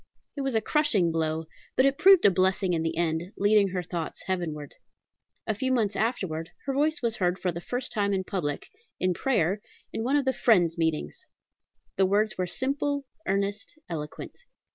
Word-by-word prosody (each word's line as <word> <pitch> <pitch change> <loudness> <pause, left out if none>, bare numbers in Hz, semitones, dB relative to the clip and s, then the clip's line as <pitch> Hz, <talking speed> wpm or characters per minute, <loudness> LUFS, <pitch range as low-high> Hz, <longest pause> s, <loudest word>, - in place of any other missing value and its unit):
It 285 - -3
was 270 -3 -1
a 220 - +3
crushing 220 - +2
blow; 160 0 -1 0.3
but 260 - +4
it 275 0 +2
proved 385 -2 +7
a 200 - +8
blessing 185 0 +2
in 165 - +1
the 160 0 -2
end, 170 +2 -1
leading 205 0 +4
her 180 -1 -3
thoughts 170 -1 -5
heavenward. 160 -6 -3 0.7
A 220 - 0
few 260 +5 -1
months 220 -5 +1
afterwards 180 -8 -1 0.2
her 275 - -1
voice 300 +1 +1
was 230 -2 +1
heard 180 -1 +1
for 185 - -1
the 170 +1 -6
first 245 +6 -4
time 205 -2 0
in 190 -1 0
public, 150 -7 -3 0.3
in 185 0 +2
prayer, 205 - +1 0.3
in 225 - -2
one 265 +4 +1
of 285 -2 +2
the 265 - +2
Friends' 180 -9 +3
meetings. 160 -3 -2 0.7
The 190 0 +4
words 205 +1 +2
were 185 -1 -1
simple, 280 +6 -1 0.2
earnest, 200 +6 -2
eloquent. 150 -3 -6
195 Hz, 185 wpm, -27 LUFS, 170-250 Hz, 0.7 s, a